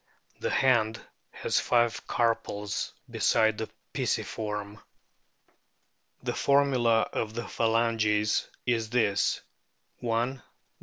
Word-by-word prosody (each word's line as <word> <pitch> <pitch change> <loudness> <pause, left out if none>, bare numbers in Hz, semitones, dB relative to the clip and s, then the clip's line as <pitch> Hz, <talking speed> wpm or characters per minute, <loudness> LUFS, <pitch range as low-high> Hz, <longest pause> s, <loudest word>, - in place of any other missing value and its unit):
The - - -1
hand 115 -5 +3 0.3
has - - 0
five 120 -1 +1
carpals 105 -3 -1 0.2
besides 110 -1 +2
the 110 - -3 0.2
pisiform. 105 -1 -3 1.4
The - - -1
formula 130 -5 +3
of 110 0 -2
the 120 -2 -4
phalanges 110 -1 +1 0.2
is 115 -3 0
this: 110 -4 +1 0.6
I, 120 - -4
i. 120 +4 0
115 Hz, 95 wpm, -28 LUFS, 105-120 Hz, 1.4 s, hand